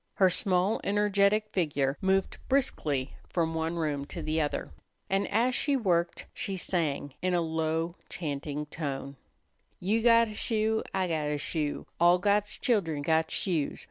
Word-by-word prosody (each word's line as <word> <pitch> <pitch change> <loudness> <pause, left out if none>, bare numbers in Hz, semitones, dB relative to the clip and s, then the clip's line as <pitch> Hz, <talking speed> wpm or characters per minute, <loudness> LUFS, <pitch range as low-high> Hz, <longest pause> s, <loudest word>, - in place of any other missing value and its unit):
Her 190 -2 +4
small, 185 +3 +2
energetic 205 +1 +2
figure 145 -8 0
moved 190 0 +1
briskly 150 - 0
from 165 -2 0
one 160 +1 -1
room 150 -4 -1
to - - -7
the 155 +1 0
other, 145 - -2 0.4
and 195 +1 +1
as 235 +4 +2
she 280 +2 +2
worked 175 -7 0
she 195 -1 -3
sang 150 -6 -1
in 185 0 +1
a - - +3
low, 160 +1 -1 0.2
chanting 150 -2 -4
tone: 140 -2 -5 0.6
"You 215 +5 +1
got 230 0 +6
a - - -7
shoe, 220 +1 0
I 185 -1 0
got 155 -3 -1
a 150 0 -1
shoe, 150 0 -2
All 175 +1 +6
God's 205 +2 +1
children 170 - 0
got 160 +1 +2
shoes. 165 -7 -1
175 Hz, 155 wpm, -29 LUFS, 155-205 Hz, 0.6 s, got